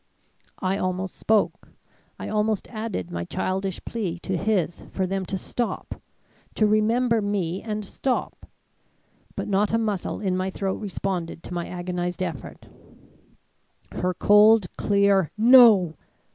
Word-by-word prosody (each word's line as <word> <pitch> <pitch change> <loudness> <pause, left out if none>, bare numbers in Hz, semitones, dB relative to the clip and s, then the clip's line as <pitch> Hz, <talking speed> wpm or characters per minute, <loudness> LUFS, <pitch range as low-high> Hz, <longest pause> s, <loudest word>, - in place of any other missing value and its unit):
"I 190 +1 -1
almost 185 0 -2
spoke; 220 -1 0 0.5
I - - -6
almost 215 -1 0
added 215 - -4
my 85 0 -3
childish 190 - -3
plea 195 -7 -3
to 190 - -2
his 185 -3 0
for 190 - -1
them 190 0 -3
to 195 - -2
stop 235 +5 -4 0.5
to 215 - +3
remember 225 +2 +2
me 195 -3 -2
and 215 -2 -4
stop. 255 +6 -3 0.9
But - - -4
not 205 +2 +1
a - - +4
muscle 210 -5 -2
in 190 -3 -1
my 185 +1 -1
throat 190 0 -3
responded 185 -4 -4
to - - -7
my 175 -1 -3
agonized 180 0 -3
effort. 170 -6 -7 1.3
Her 180 0 -2
cold, 210 -1 +5
clear 200 -4 +2
'No!' 220 -7 +7
195 Hz, 130 wpm, -24 LUFS, 180-215 Hz, 1.3 s, No